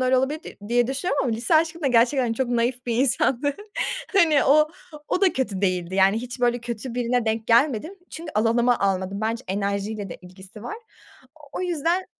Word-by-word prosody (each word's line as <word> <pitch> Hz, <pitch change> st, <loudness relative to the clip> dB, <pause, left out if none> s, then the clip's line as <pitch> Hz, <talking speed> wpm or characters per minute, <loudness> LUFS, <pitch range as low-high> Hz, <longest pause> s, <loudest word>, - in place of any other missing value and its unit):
öyle 255 Hz, 0 st, +3 dB
olabilirdi 280 Hz, +5 st, -2 dB
diye 240 Hz, 0 st, +3 dB
düşünüyorum 275 Hz, +2 st, -1 dB
ama 240 Hz, -, 0 dB
lise 235 Hz, +7 st, 0 dB
aşkım 325 Hz, +1 st, +2 dB
da 280 Hz, -, +1 dB
gerçekten 245 Hz, 0 st, +3 dB
çok 245 Hz, +2 st, -1 dB
naif 245 Hz, +1 st, -1 dB
bir 235 Hz, -, 0 dB
insandı, 270 Hz, +2 st, +1 dB, 0.6 s
hani, 330 Hz, -7 st, +4 dB
o 305 Hz, +2 st, +5 dB, 0.4 s
o -, -, 0 dB
da 385 Hz, -4 st, +4 dB
kötü 220 Hz, -9 st, -2 dB
değildi, 185 Hz, -2 st, -1 dB
yani, 195 Hz, +2 st, +4 dB
hiç, 245 Hz, +2 st, -6 dB
böyle, 245 Hz, -1 st, +2 dB
kötü 235 Hz, +1 st, -6 dB
birine 245 Hz, 0 st, 0 dB
denk 220 Hz, 0 st, -1 dB
gelmedim. 265 Hz, -, +2 dB, 0.2 s
Çünkü 320 Hz, -1 st, -8 dB
alanıma 235 Hz, +2 st, +2 dB
almadım, 195 Hz, 0 st, -1 dB
bence 230 Hz, +3 st, -2 dB
enerjiyle 200 Hz, +1 st, -2 dB
de -, -, -7 dB
ilgisi 190 Hz, +3 st, -13 dB
var. 420 Hz, -, -5 dB, 0.8 s
O -, -, -4 dB
yüzden 345 Hz, +1 st, 0 dB
240 Hz, 175 wpm, -24 LUFS, 220-280 Hz, 0.8 s, o